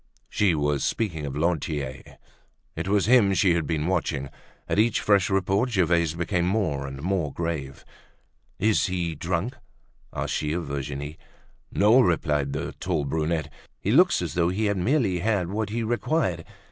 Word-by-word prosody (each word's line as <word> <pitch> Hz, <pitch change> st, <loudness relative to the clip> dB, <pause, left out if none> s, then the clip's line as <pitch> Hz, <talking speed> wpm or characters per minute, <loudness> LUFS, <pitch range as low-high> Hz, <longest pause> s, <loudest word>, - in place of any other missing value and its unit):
She 95 Hz, -5 st, +2 dB
was 75 Hz, -2 st, 0 dB
speaking 80 Hz, -10 st, -2 dB
of 70 Hz, +1 st, -5 dB
Lantier. 75 Hz, -5 st, -2 dB, 0.6 s
It -, -, -4 dB
was 100 Hz, 0 st, +2 dB
him 120 Hz, -3 st, +5 dB
that 95 Hz, -, +1 dB
she 95 Hz, -2 st, +4 dB
had 85 Hz, -2 st, -1 dB
been 80 Hz, -2 st, -1 dB
watching. 80 Hz, -6 st, -1 dB, 0.4 s
At -, -, 0 dB
each 110 Hz, 0 st, +3 dB
fresh 100 Hz, -2 st, +3 dB
report 95 Hz, +5 st, +1 dB
Gervaise 85 Hz, -6 st, +2 dB
became 85 Hz, 0 st, 0 dB
more 90 Hz, -9 st, 0 dB
and 70 Hz, +1 st, -8 dB
more 90 Hz, -5 st, 0 dB
grave. 75 Hz, -4 st, -4 dB, 0.7 s
"Is 110 Hz, 0 st, +2 dB
he 90 Hz, -3 st, -2 dB
drunk?" 90 Hz, -, -2 dB, 0.5 s
asked -, -, -3 dB
she 75 Hz, 0 st, -1 dB
of 85 Hz, 0 st, -2 dB
Virginie. 70 Hz, +2 st, -5 dB, 0.5 s
"No," 105 Hz, +6 st, +5 dB
replied 75 Hz, -, +1 dB
the -, -, -3 dB
tall 85 Hz, -5 st, -1 dB
brunette. 80 Hz, +1 st, -1 dB, 0.3 s
"He -, -, -1 dB
looks -, -, +4 dB
as -, -, -4 dB
though 85 Hz, -1 st, +2 dB
he 105 Hz, +4 st, -1 dB
had 100 Hz, -1 st, +1 dB
merely 100 Hz, -2 st, +1 dB
had 100 Hz, -2 st, 0 dB
what 105 Hz, 0 st, -2 dB
he 115 Hz, +2 st, -2 dB
required. 115 Hz, -, -1 dB
85 Hz, 165 wpm, -25 LUFS, 75-100 Hz, 0.7 s, him